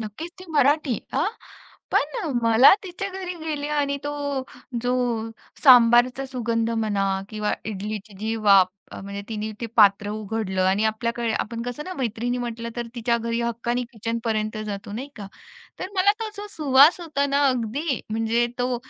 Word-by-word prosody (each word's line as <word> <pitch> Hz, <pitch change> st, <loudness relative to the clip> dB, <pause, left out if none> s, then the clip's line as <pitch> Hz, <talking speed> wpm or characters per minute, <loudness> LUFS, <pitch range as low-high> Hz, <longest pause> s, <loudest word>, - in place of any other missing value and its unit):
नक्कीच, 220 Hz, +11 st, -6 dB
ती 370 Hz, -, -10 dB
मराठी. 290 Hz, -3 st, +2 dB, 0.2 s
हां, -, -, +2 dB, 0.6 s
पण 290 Hz, 0 st, +1 dB
अ, -, -, -2 dB
मला 230 Hz, +9 st, +7 dB
तिच्या 380 Hz, +1 st, -5 dB
घरी 370 Hz, -2 st, -5 dB
गेले 295 Hz, -2 st, -3 dB
आणि 285 Hz, -1 st, 0 dB
तो 290 Hz, -, -2 dB, 0.7 s
जो 245 Hz, 0 st, +1 dB, 0.7 s
सांबारचा 245 Hz, 0 st, +6 dB
सुगंध 230 Hz, -3 st, -1 dB
म्हणा 215 Hz, -3 st, 0 dB, 0.3 s
किंवा 210 Hz, -1 st, -2 dB
इडलीची 210 Hz, 0 st, -5 dB
जी 220 Hz, +1 st, -1 dB
वाफ 200 Hz, -4 st, +5 dB, 0.2 s
अ, -, -, -7 dB
म्हणजे 200 Hz, +1 st, -6 dB
तिने 215 Hz, -1 st, -3 dB
ते 235 Hz, -, -2 dB
पात्र 205 Hz, -1 st, +5 dB
उघडलं 210 Hz, -3 st, -2 dB
आणि 200 Hz, +3 st, +2 dB
आपल्याकडे 230 Hz, +1 st, -1 dB
आपण 230 Hz, +2 st, -3 dB
कसं 245 Hz, +4 st, -5 dB
ना 370 Hz, -, -6 dB
मैत्रिणी 245 Hz, 0 st, -2 dB
म्हटलं 235 Hz, -1 st, -4 dB
तर 240 Hz, -, -3 dB
तिच्या 235 Hz, 0 st, +1 dB
घरी 230 Hz, +1 st, -2 dB
हक्काने 235 Hz, +1 st, -1 dB
किचनपर्यंत 220 Hz, -1 st, -2 dB
जातो 200 Hz, -1 st, -6 dB
नाही 255 Hz, +6 st, -5 dB
का. 205 Hz, -2 st, -7 dB, 0.5 s
तर 370 Hz, -, -4 dB
मला 395 Hz, +2 st, +5 dB
तो 445 Hz, -, -2 dB
जो 410 Hz, +1 st, -6 dB
सुवास 295 Hz, +1 st, +5 dB
होता 300 Hz, -4 st, -1 dB
ना, 280 Hz, +1 st, +1 dB
अगदी 255 Hz, +4 st, -1 dB
म्हणजे 225 Hz, +2 st, +1 dB
तो 250 Hz, 0 st, 0 dB
235 Hz, 160 wpm, -24 LUFS, 220-280 Hz, 0.7 s, मला